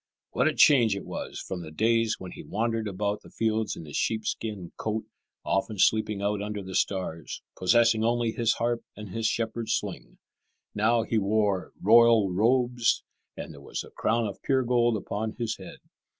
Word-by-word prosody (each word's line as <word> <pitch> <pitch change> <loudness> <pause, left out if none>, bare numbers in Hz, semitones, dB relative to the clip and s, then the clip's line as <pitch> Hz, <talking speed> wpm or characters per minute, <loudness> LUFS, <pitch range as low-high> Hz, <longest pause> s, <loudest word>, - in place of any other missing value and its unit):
What 125 - +2
a 155 - +1
change 120 -8 +5
it 100 - -6
was - - -6
from 90 -2 -5
the 80 - -8
days 115 +6 +2
when 95 - -8
he - - -9
wandered 115 +1 -2
about 100 +1 -2
the - - -15
fields 110 -1 -1
in 80 - -9
his 75 - -9
sheepskin 110 -4 -2
coat, 110 0 -3 0.4
often 100 +2 -1
sleeping 105 0 +2
out 100 0 0
under 105 -1 -4
the 95 0 -8
stars, 90 -5 -2
possessing 115 +3 +3
only 120 0 +1
his 115 0 +1
harp 120 0 -1
and 105 -1 -8
his 110 +4 -1
shepherd's 115 0 -1
sling. - - -6 0.6
Now 115 +2 +2
he 115 0 0
wore 100 -2 0
royal 115 -1 +6
robes, 120 +3 +2 0.3
and - - -7
there 70 - -13
was - - -5
a - - -14
crown 115 +1 0
of 100 - -6
pure 130 -2 +2
gold 120 -2 +2
upon 110 +2 -4
his 115 -2 -3
head. - - -10
110 Hz, 180 wpm, -27 LUFS, 100-115 Hz, 0.6 s, royal